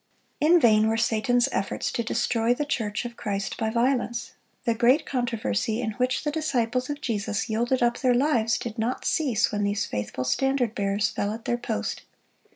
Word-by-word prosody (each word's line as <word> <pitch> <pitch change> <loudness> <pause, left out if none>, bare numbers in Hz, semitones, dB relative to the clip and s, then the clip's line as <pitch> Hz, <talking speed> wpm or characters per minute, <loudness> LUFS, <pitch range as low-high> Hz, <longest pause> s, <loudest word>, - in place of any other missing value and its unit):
(62) - - +3
In - - +7
vain 220 -5 +5
were 225 0 +1
Satan's 235 +2 +2
efforts 195 - -2
to - - -1
destroy 230 +1 +1
the 295 - -2
church 220 -7 -2
of 235 0 -6
Christ 200 -4 -3
by 220 - -1
violence. 235 0 0 0.3
The 235 - +3
great 250 +7 +3
controversy 230 - -1
in 230 -3 -1
which 250 +4 -1
the 295 - -1
disciples 255 -5 -1
of 290 0 -4
Jesus 210 -3 -2
yielded 240 +3 +1
up 240 0 +1
their 250 -2 +3
lives, 240 -5 +2
did 230 -1 -6
not 235 +3 -2
cease 245 -8 +1
when 205 - -1
these 205 +1 0
faithful 105 +4 -4
standard 250 - +1
bearers 200 -2 0
fell 205 - -2
at 225 +1 -7
their 240 - 0
post. 100 - -3
235 Hz, 185 wpm, -26 LUFS, 215-250 Hz, 0.3 s, In